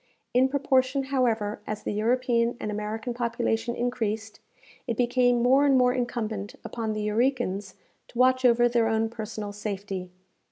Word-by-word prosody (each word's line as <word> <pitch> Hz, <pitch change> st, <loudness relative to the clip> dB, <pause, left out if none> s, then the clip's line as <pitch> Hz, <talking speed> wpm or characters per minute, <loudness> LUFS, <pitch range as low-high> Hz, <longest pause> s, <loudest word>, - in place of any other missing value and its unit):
In 255 Hz, +2 st, +4 dB
proportion, 270 Hz, -1 st, +1 dB
however, 225 Hz, -5 st, +1 dB
as 215 Hz, 0 st, -4 dB
the -, -, -2 dB
European 235 Hz, +2 st, +1 dB
and 210 Hz, -, -3 dB
American 215 Hz, +3 st, -4 dB
population 235 Hz, -1 st, -1 dB
increased, 220 Hz, -3 st, -2 dB, 0.5 s
it 230 Hz, -3 st, -2 dB
became 245 Hz, -1 st, +2 dB
more 265 Hz, +3 st, +5 dB
and 275 Hz, -2 st, +4 dB
more 250 Hz, -1 st, +4 dB
incumbent 225 Hz, -5 st, -3 dB
upon 225 Hz, -2 st, -3 dB
the 215 Hz, -, -3 dB
Eurekans, 210 Hz, -4 st, 0 dB, 0.3 s
to -, -, -13 dB
watch 255 Hz, +1 st, +4 dB
over 240 Hz, -1 st, +5 dB
their 235 Hz, -1 st, +2 dB
own 225 Hz, 0 st, +1 dB
personal 215 Hz, -2 st, -6 dB
safety. 200 Hz, -3 st, -5 dB
235 Hz, 150 wpm, -26 LUFS, 215-250 Hz, 0.5 s, more